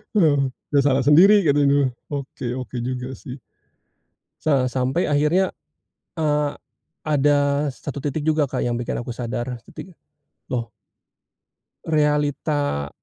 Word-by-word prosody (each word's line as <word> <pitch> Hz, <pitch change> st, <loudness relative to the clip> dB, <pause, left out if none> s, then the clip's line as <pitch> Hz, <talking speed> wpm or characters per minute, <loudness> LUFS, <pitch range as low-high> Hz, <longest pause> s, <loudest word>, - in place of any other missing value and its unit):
Oh, 145 Hz, -8 st, +4 dB, 0.2 s
"Ya, 145 Hz, -, +4 dB
salah 135 Hz, -1 st, +2 dB
sendiri," 195 Hz, +8 st, +6 dB
katanya. 140 Hz, -3 st, +3 dB, 0.2 s
Oke 135 Hz, -4 st, -5 dB
oke 125 Hz, -1 st, -6 dB
juga, 125 Hz, +1 st, -4 dB
sih. 125 Hz, -, -8 dB, 1.1 s
Sa 135 Hz, -5 st, +2 dB
sampai 130 Hz, +6 st, 0 dB
akhirnya, 150 Hz, +6 st, +2 dB, 0.7 s
eee, 150 Hz, -2 st, +1 dB, 0.5 s
ada 145 Hz, -1 st, +2 dB
satu 145 Hz, +1 st, -7 dB
titik 145 Hz, +1 st, -2 dB
juga, 155 Hz, -1 st, +2 dB
Kak, 130 Hz, -1 st, -3 dB
yang 120 Hz, -1 st, -1 dB
bikin 120 Hz, -, -3 dB
aku 120 Hz, -, -8 dB
sadar. 120 Hz, +1 st, -4 dB
Titik, 185 Hz, -3 st, -11 dB, 0.5 s
loh 120 Hz, -2 st, -2 dB, 1.2 s
realita, 145 Hz, -, 0 dB
145 Hz, 115 wpm, -22 LUFS, 130-150 Hz, 1.2 s, sendiri